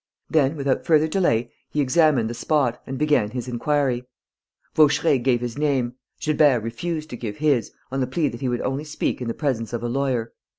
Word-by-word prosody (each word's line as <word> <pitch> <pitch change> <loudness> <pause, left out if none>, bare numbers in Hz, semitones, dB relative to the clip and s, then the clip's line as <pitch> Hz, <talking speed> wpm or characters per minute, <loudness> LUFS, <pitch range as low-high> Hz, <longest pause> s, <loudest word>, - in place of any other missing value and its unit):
Then, 150 -2 +3
without 140 -3 0
further 155 -1 +4
delay, 120 - +1 0.2
he 150 - -3
examined 140 -3 +3
the 115 - -4
spot 125 -1 0
and 135 0 -4
began 145 -8 +2
his 125 +2 -5
inquiry. 130 0 0 0.7
Vaucheray 150 -1 +4
gave 120 -1 +1
his 120 +2 -4
name; 135 -5 +1 0.3
Gilbert 150 -5 +3
refused 155 +7 -4
to - - -4
give 105 -4 -5
his, 145 -6 +1 0.2
on 135 - -2
the 130 - 0
plea 150 +4 0
that 120 +1 -9
he 130 - 0
would 120 -1 -1
only 135 +3 -2
speak 150 -3 -2
in 125 - -3
the 115 - -2
presence 125 -7 -2
of 120 0 -3
a - - -1
lawyer. 125 -2 -1
135 Hz, 200 wpm, -23 LUFS, 120-150 Hz, 0.7 s, further